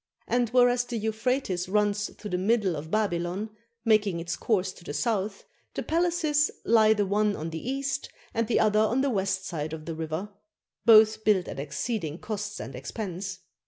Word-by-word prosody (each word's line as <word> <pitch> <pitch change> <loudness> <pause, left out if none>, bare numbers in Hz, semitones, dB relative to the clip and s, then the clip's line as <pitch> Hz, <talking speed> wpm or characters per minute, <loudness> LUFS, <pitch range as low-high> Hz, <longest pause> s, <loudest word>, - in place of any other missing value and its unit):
And 245 -1 +1
whereas 245 0 +4
the 240 -1 -4
Euphrates 220 -4 -1
runs 205 0 +1
through 210 -2 -8
the 180 - +1
middle 200 -2 +2
of 155 +1 -6
Babylon, 195 0 -1 0.3
making 210 -5 +3
its 170 0 -3
course 190 -4 0
to - - -16
the 145 - -6
south, 200 +2 -1 0.3
the - - -2
palaces 325 -3 +2 0.2
lie 220 -1 +5
the 205 -1 +1
one 205 +1 +1
on 160 +2 -5
the 165 +10 -5
east, 275 0 -2 0.2
and 230 -2 0
the 235 - +2
other 215 -1 +3
on 220 +4 +2
the 275 -1 +1
west 190 -2 -1
side 155 -2 -4
of 155 -1 -7
the 165 - -4
river; 160 +5 -4 0.6
both 220 -1 +7
built 200 -5 +3
at - - -6
exceeding 155 - -3
costs 210 0 -5
and 135 - -6
expense. 185 - -5
210 Hz, 180 wpm, -27 LUFS, 180-230 Hz, 0.6 s, both